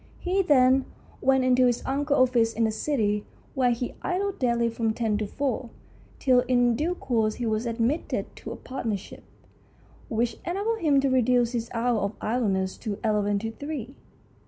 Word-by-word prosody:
He 380 +2 0
then 265 -5 +4 0.4
went 265 0 +3
into 255 0 +4
his 240 -1 -1
uncle's 280 -1 +2
office 230 -2 +2
in 230 - 0
the 220 - +2
City, 215 -3 0 0.3
where 255 -2 +2
he 240 +1 -2
idled 390 +2 -2
daily 235 -2 +2
from 225 -1 -1
ten 225 -3 0
to 210 - -2
four, 260 -1 -2 0.5
till 255 -3 +4
in 245 -2 +3
due 335 +8 -1
course 225 -8 0
he 245 - -4
was 220 +1 -1
admitted 230 +7 -1
to - - -7
a - - -5
partnership, 225 -7 -5 0.9
which 230 -1 -1
enabled 410 +6 -1
him 290 -4 +3
to 275 - +1
reduce 245 -1 +3
his 235 -2 -3
hours 235 0 +1
of 200 +2 -2
idleness 200 -5 -1
to 205 -2 -4
eleven 205 -2 +1
to 225 +2 -3
three. 280 0 -6
245 Hz, 170 wpm, -26 LUFS, 225-270 Hz, 0.9 s, then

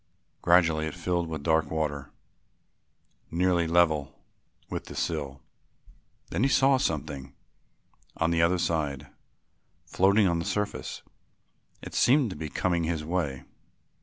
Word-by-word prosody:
Gradually 80 -3 +3
it 80 - -6
filled 85 -1 -1
with 80 -3 -5
dark 80 -2 +2
water 75 -3 -2 1.2
nearly 85 0 +1
level 80 -4 +2 0.5
with - - -5
the - - -9
sill. 70 -5 -3 0.9
Then - - -1
he 135 - +3
saw 135 0 +4
something 70 - -3 0.8
on 80 0 +1
the 85 -1 +2
other 85 +2 +3
side, 75 -6 -2 0.7
floating 100 +2 +3
on 85 -1 +1
the 85 - -3
surface. 105 0 -3 0.8
It - - -8
seemed 130 -3 +3
to - - -6
be 80 - -5
coming 85 +1 0
his 80 -2 -2
way. 75 -6 -2
85 Hz, 130 wpm, -27 LUFS, 75-90 Hz, 1.2 s, saw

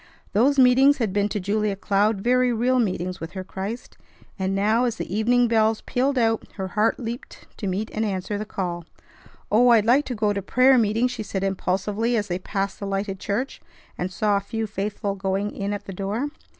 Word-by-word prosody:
Those 265 +7 +3
meetings 265 +2 +6
had 225 -7 -1
been 205 0 +1
to 210 - -2
Julia 205 +1 0
Cloud 200 +1 +1
very 250 +2 +3
real 250 +3 +2
meetings 185 -4 -1
with 165 +2 -6
her 190 -1 -5
Christ; 195 +5 -6 0.4
and 190 0 0
now, 215 +5 +2
as 235 -3 -1
the 195 - -5
evening 240 +3 +3
bells 220 -1 +2
pealed 265 +2 0
out, 225 -2 +2
her 190 -2 -5
heart 215 +4 +1
leaped 235 0 -7
to 205 - -4
meet 195 +4 -2
and 220 - -1
answer 200 0 -2
the - - -2
call. 175 -4 -4 0.7
"Oh! 240 +4 +5
I'd 225 -3 +5
like 265 +5 +4
to 250 - -4
go 210 -1 +1
to 200 - -2
prayer 255 +6 +4
meeting!" 225 +2 +2
she 245 -3 -5
said 195 -2 -3
impulsively 200 +4 0
as 205 -2 -2
they 175 +1 -1
passed 195 +1 -3
the 200 - -4
lighted 195 0 -2
church, 210 +8 -3 0.3
and 180 +1 -3
saw 205 +2 +1
a - - +1
few 225 +3 -4
faithful 205 0 -3
going 195 +1 -2
in 200 0 -3
at 205 -1 -4
the 195 - -7
door. 205 +9 -2
210 Hz, 205 wpm, -24 LUFS, 195-235 Hz, 0.7 s, meetings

